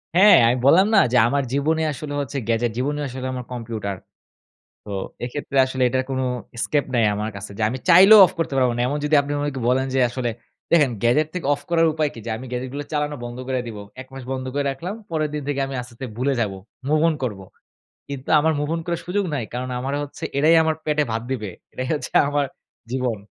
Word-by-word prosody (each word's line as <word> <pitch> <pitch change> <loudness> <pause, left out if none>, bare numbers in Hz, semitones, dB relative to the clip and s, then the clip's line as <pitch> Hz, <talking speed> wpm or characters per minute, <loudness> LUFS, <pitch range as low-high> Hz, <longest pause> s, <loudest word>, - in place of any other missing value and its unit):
হ্যাঁ, 205 +3 +8
আমি 120 - +3
বললাম 185 +8 +6
না? 195 - +8
যে 125 - +3
আমার 140 +3 +1
জীবনই 155 +3 +1
আসলে 145 +2 -6
হচ্ছে 140 0 -5
গ্যাজেট, 115 0 +1
জীবনই 145 +4 -1
আসলে 130 0 -5
আমার 125 -1 -5
কম্পিউটার। 110 -5 -4 0.9
তো - - -10 0.4
এক্ষেত্রে 140 +2 -4
আসলে 130 0 -1
এটার 130 +1 0
কোন 130 -1 -2 0.4
escape 145 +4 0
নাই 115 - +3
আমার 105 +1 -2
কাছে। 100 +1 -7
যে 115 - -4
আমি 130 - -3
চাইলেও 195 +5 +9
অফ - - -4
করতে 165 -4 -1
পারব 130 -1 +3
না। 120 - -1
এমন 145 +3 -1
যদি 150 +1 +3
আপনি 140 0 -6
আমাকে 145 -2 -2
বলেন 130 +1 +2
যে - - +3
আসলে 120 0 -2 0.4
দেখেন 150 -6 +5
গ্যাজেট 135 +6 +3
থেকে 180 - -4
অফ 145 - -5
করার 165 -1 +4
উপায় 155 -1 0
কি? - - -10
যে - - -4
আমি 125 - -9
গ্যাজেট 125 +1 -3
গুলো 145 +1 -4
চালানো 150 0 -1
বন্ধ 120 0 -6
কইরা 130 -1 -1
দিবো। 105 -3 -7 0.2
১ 130 - -12
মাস 135 -1 -8
বন্ধ 130 -1 -3
করে 145 0 -1
রাখলাম, 170 +9 -5 0.2
পরের 155 -2 0
দিন 150 - -3
থেকে 145 -1 -1
আমি 135 0 -6
আস্তে, 120 -1 -12
আস্তে 130 - -6
ভুলে 135 +3 +1
যাব। 105 -3 0 0.4
মুভ 155 +1 +2
অন 160 - -1
করব। 105 -5 -5 0.7
কিন্তু 140 -2 -6
আমার 160 +2 +2
মুভ 150 0 -2
অন 165 - -3
করার 170 -1 -2
সুযোগ 195 +3 -1
নাই। 130 - -2
কারণ 125 +1 -3
আমারে 135 +3 -2
হচ্ছে 145 - -10
এরাই 155 +4 +5
আমার 160 0 +1
পেটে 150 -1 +2
ভাত 110 0 -1
দিবে। 110 -6 -3 0.2
এরাই 130 - -4
হচ্ছে 150 - -4 0.2
আমার 145 0 +1 0.5
জীবন। 125 -3 -1
135 Hz, 225 wpm, -22 LUFS, 125-150 Hz, 0.9 s, চাইলেও